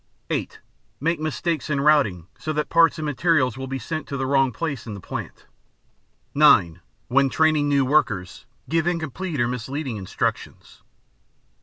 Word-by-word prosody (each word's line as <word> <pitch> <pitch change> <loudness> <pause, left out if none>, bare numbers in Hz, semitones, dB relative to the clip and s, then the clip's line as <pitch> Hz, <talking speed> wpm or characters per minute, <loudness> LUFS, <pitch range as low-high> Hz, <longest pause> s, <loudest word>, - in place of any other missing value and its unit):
(8) - - -3 0.4
Make 165 +4 0
mistakes 155 +1 -2
in 140 -2 0
routing 140 - +3
so 155 - -3
that 150 0 -2
parts 165 0 +4
and 155 - -4
materials 145 -4 +1
will 130 0 -6
be 135 0 -3
sent 155 +5 -5
to 140 - -4
the 135 - -2
wrong 135 -1 +2
place 140 0 -4
in 105 - -5
the - - -8
plant. - - -7 0.9
(9) 85 +1 +5 0.3
When 135 +2 +3
training 155 0 +2
new 140 -2 +3
workers, 110 -9 0 0.2
give 165 +4 0
incomplete 165 -1 -3
or 120 - +2
misleading 125 +1 -4
instructions. 95 -2 -4
140 Hz, 155 wpm, -23 LUFS, 125-155 Hz, 0.9 s, 9